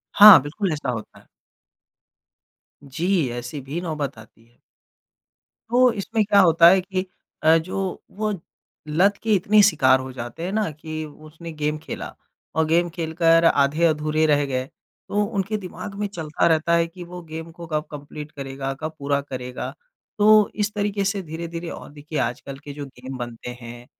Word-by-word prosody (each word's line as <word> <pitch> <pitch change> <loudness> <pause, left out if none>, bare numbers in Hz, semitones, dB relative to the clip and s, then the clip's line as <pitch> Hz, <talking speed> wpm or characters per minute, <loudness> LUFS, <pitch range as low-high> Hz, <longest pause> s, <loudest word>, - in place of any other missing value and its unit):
हाँ, 210 -5 +11
बिल्कुल 175 +7 -3
ऐसा 145 -3 -4
होता 110 -3 -7
है। - - -22 1.6
जी, 165 +2 0
ऐसी 120 +4 -5
भी 140 +6 -5
नौबत 150 -7 -4
आती 110 +1 -16
है। 120 +1 -30 1.1
तो 250 +1 +5
इसमें 220 +1 -1
क्या 200 0 +4
होता 170 -2 +6
है 190 +1 +4
कि 185 0 -3 0.4
अ, 160 +1 +6
जो 185 +3 -3
वो 215 +1 -2 0.6
लत 185 +7 +3
के 220 -1 +2
इतने 205 +3 +4
शिकार 130 -9 +4
हो 130 0 -6
जाते 120 +6 -7
हैं 180 - -2
ना 215 -3 0
कि 155 +1 -6
उसने 155 +2 -11
गेम 150 0 -2
खेला 155 - -7 0.4
और 160 - +3
गेम 170 +2 +2
खेलकर 165 0 +2
आधे-अधूरे 155 +1 +2
रह 145 -1 +3
गए। 130 -2 -2 0.4
तो 205 +1 +1
उनके 205 0 -2
दिमाग 195 +1 -8
में 205 +1 -2
चलता 165 -5 -1
रहता 165 0 +2
है 170 0 +3
कि 175 +2 -10
वो 180 +1 -9
गेम 160 0 -8
को 170 0 -10
कब 155 -1 -1
कंप्लीट 150 +1 -8
करेगा, 135 -1 -5
कब 155 0 -4
पूरा 140 0 0
करेगा? 125 -2 -6 0.5
तो 215 0 +6
इस 210 0 -1
तरीके 205 -1 -1
से 200 0 0
धीरे-धीरे 165 +1 -6
और - - -9
देखिए 150 +1 -5
आजकल 130 +3 -3
के 145 - -8
जो 145 0 -6
गेम 130 0 -9
बनते 120 -1 -7
हैं 120 +1 -10
160 Hz, 170 wpm, -23 LUFS, 140-185 Hz, 1.6 s, हाँ